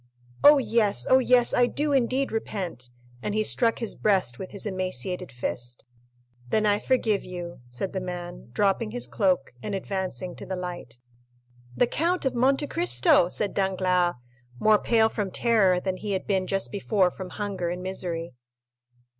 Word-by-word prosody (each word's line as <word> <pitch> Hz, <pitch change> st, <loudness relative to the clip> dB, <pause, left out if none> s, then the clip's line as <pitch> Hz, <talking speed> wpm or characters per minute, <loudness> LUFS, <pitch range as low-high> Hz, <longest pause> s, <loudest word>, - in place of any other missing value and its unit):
"Oh, 295 Hz, 0 st, +9 dB
yes; 215 Hz, -, +1 dB
oh, 260 Hz, -, +6 dB
yes, 250 Hz, -1 st, +3 dB
I 245 Hz, -, +4 dB
do 295 Hz, +3 st, -1 dB
indeed 265 Hz, +1 st, +1 dB
repent." 180 Hz, -, -4 dB, 0.3 s
And 210 Hz, -, -3 dB
he 215 Hz, -, +2 dB
struck 230 Hz, +1 st, +2 dB
his 230 Hz, -3 st, -3 dB
breast 190 Hz, -, +1 dB
with 185 Hz, -, -6 dB
his 200 Hz, -, -7 dB
emaciated 185 Hz, -, -3 dB
fist. 120 Hz, 0 st, -5 dB, 0.6 s
"Then 215 Hz, -, +2 dB
I 205 Hz, 0 st, +3 dB
forgive 220 Hz, -6 st, +1 dB
you," 175 Hz, -4 st, -7 dB
said 125 Hz, +10 st, -4 dB
the 190 Hz, -, -1 dB
man, 175 Hz, -6 st, -7 dB
dropping 200 Hz, -, +1 dB
his 245 Hz, +2 st, -2 dB
cloak, 185 Hz, -, 0 dB
and 200 Hz, -, -3 dB
advancing 185 Hz, -4 st, -4 dB
to -, -, -8 dB
the 190 Hz, -, -3 dB
light. 175 Hz, -10 st, -7 dB, 0.8 s
"The -, -, +5 dB
Count 335 Hz, +7 st, -1 dB
of 265 Hz, -, +1 dB
Monte 270 Hz, +4 st, +2 dB
Cristo!" 325 Hz, -, +3 dB
said 205 Hz, +2 st, -1 dB
Danglars, 185 Hz, -2 st, +1 dB, 0.4 s
more 215 Hz, -1 st, +5 dB
pale 225 Hz, -2 st, +3 dB
from 210 Hz, -3 st, -3 dB
terror 195 Hz, -4 st, +3 dB
than 185 Hz, 0 st, -3 dB
he 205 Hz, 0 st, -3 dB
had 190 Hz, -, -2 dB
been 190 Hz, -2 st, 0 dB
just 195 Hz, 0 st, -1 dB
before 200 Hz, -2 st, +1 dB
from 185 Hz, 0 st, -8 dB
hunger 195 Hz, -3 st, -3 dB
and 180 Hz, +1 st, -4 dB
misery. 170 Hz, -4 st, -4 dB
195 Hz, 165 wpm, -26 LUFS, 180-230 Hz, 0.8 s, Oh